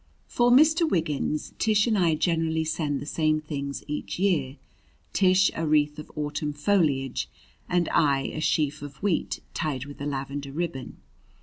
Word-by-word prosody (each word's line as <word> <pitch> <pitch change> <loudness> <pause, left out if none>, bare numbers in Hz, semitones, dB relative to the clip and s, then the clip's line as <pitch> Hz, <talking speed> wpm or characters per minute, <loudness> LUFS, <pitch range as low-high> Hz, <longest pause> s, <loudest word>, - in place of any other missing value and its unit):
For 240 0 +2
Mr. 315 +6 +5
Wiggins 155 - -1
Tish 210 -2 +3
and 230 -3 +1
I 170 -5 +3
generally 160 -1 0
send 155 -3 -1
the - - -7
same 155 0 +1
things 140 -2 -5
each 150 0 -4
year 155 -8 0 0.6
Tish 190 0 +4
a 165 0 -2
wreath 150 0 +2
of 150 - -10
autumn 150 0 -3
foliage 145 - +1 0.4
and 175 -1 +2
I 140 -3 +3
a 155 - -4
sheaf 150 -1 0
of 145 -1 -8
wheat 195 -5 0
tied 145 -5 -2
with 145 0 -11
a 145 - -2
lavender 140 0 -4
ribbon. 150 -5 -4
155 Hz, 160 wpm, -26 LUFS, 145-175 Hz, 0.6 s, Mr